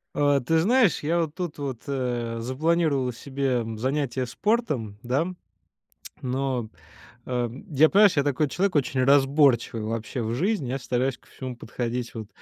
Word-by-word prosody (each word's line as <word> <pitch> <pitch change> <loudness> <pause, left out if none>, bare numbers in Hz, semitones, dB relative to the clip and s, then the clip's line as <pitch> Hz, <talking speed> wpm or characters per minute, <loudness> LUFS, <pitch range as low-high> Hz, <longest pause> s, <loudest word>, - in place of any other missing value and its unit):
А, 145 -1 +3
ты 160 +6 +1
знаешь, 225 - +3
я 165 +3 +1
вот 155 -3 -3
тут 175 -5 -4
вот, 135 -5 -4
э, 120 -4 -2
запланировал 140 +1 +1
себе 130 0 -1
занятие 130 +1 -1
спортом, 145 - -1
да. 130 +6 0 1.0
Но, 130 -3 -2 0.6
э, 125 -2 -1 0.2
я, 155 +2 +5
понимаешь, 205 -1 +5
я 140 - +4
такой 145 +1 +1
человек 190 +3 0
очень 135 -2 +1
разборчивый 135 -4 +3
вообще 115 +3 -3
в 110 0 -2
жизни. 170 - 0
Я 135 +2 -2
стараюсь 125 +1 -1
ко - - -27
всему 130 -2 -7
подходить 120 0 -4
вот 110 -2 -6
135 Hz, 150 wpm, -25 LUFS, 120-150 Hz, 1.0 s, я